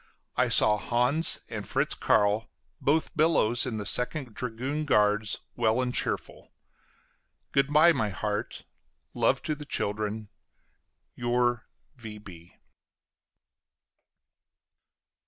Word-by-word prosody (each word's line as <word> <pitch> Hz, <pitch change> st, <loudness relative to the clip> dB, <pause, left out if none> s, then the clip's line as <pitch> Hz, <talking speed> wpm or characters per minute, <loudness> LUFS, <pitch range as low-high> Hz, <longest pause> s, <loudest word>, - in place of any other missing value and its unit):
I -, -, +1 dB
saw 105 Hz, 0 st, +5 dB
Hans 125 Hz, +9 st, +2 dB
and -, -, -7 dB
Fritz -, -, 0 dB
Carl, 105 Hz, +2 st, +1 dB, 0.3 s
both 155 Hz, +4 st, 0 dB
Billows, 150 Hz, -7 st, +3 dB
in 115 Hz, -3 st, -4 dB
the 105 Hz, -, -5 dB
Second 125 Hz, +1 st, +1 dB
dragoon 130 Hz, +6 st, -4 dB
guards, 105 Hz, -5 st, +1 dB
well 115 Hz, 0 st, +1 dB
and 125 Hz, -1 st, -1 dB
cheerful. -, -, -4 dB, 1.0 s
Good 140 Hz, +1 st, +1 dB
by, 160 Hz, +3 st, +6 dB
my 110 Hz, -8 st, -1 dB
heart; 105 Hz, +2 st, -4 dB, 0.5 s
love 120 Hz, +3 st, +1 dB
to 155 Hz, -, -2 dB
the 150 Hz, 0 st, -8 dB
children. 105 Hz, -4 st, -3 dB, 0.8 s
Your 120 Hz, 0 st, -1 dB, 0.3 s
V. 105 Hz, -7 st, -12 dB
120 Hz, 100 wpm, -27 LUFS, 105-140 Hz, 1.0 s, by